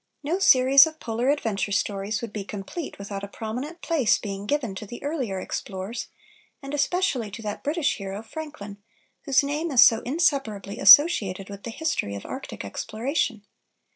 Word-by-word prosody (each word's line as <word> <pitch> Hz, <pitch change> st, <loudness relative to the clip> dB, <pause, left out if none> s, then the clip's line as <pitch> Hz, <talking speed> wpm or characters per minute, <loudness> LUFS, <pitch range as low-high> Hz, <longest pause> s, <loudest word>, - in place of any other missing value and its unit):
No 330 Hz, +6 st, -1 dB
series 275 Hz, -4 st, +7 dB
of 315 Hz, 0 st, -9 dB
Polar 235 Hz, +3 st, -1 dB
adventure 220 Hz, -8 st, -1 dB
stories 205 Hz, +1 st, -1 dB
would 225 Hz, -3 st, -6 dB
be 210 Hz, -, -4 dB
complete 205 Hz, -, -7 dB
without 200 Hz, 0 st, -6 dB
a -, -, -4 dB
prominent 250 Hz, -, -6 dB
place 300 Hz, -, +2 dB
being 200 Hz, -1 st, -6 dB
given 270 Hz, -7 st, -1 dB
to 195 Hz, +2 st, -8 dB
the 240 Hz, -, -9 dB
earlier 265 Hz, -10 st, -2 dB
explorers, 190 Hz, +5 st, -5 dB, 0.5 s
and 275 Hz, 0 st, -8 dB
especially 290 Hz, -, 0 dB
to 215 Hz, +3 st, -9 dB
that 210 Hz, -1 st, -5 dB
British 300 Hz, +1 st, 0 dB
hero, 195 Hz, +1 st, -6 dB
Franklin, 225 Hz, -7 st, -8 dB, 0.5 s
whose 275 Hz, -1 st, +3 dB
name 295 Hz, +4 st, -2 dB
is 250 Hz, -5 st, +7 dB
so 225 Hz, -3 st, +5 dB
inseparably 270 Hz, -, -1 dB
associated 200 Hz, -, +6 dB
with 200 Hz, 0 st, -9 dB
the -, -, -4 dB
history 225 Hz, -, -2 dB
of 100 Hz, -, -8 dB
Arctic -, -, -7 dB
exploration. 230 Hz, -, -3 dB
230 Hz, 165 wpm, -25 LUFS, 200-290 Hz, 0.5 s, series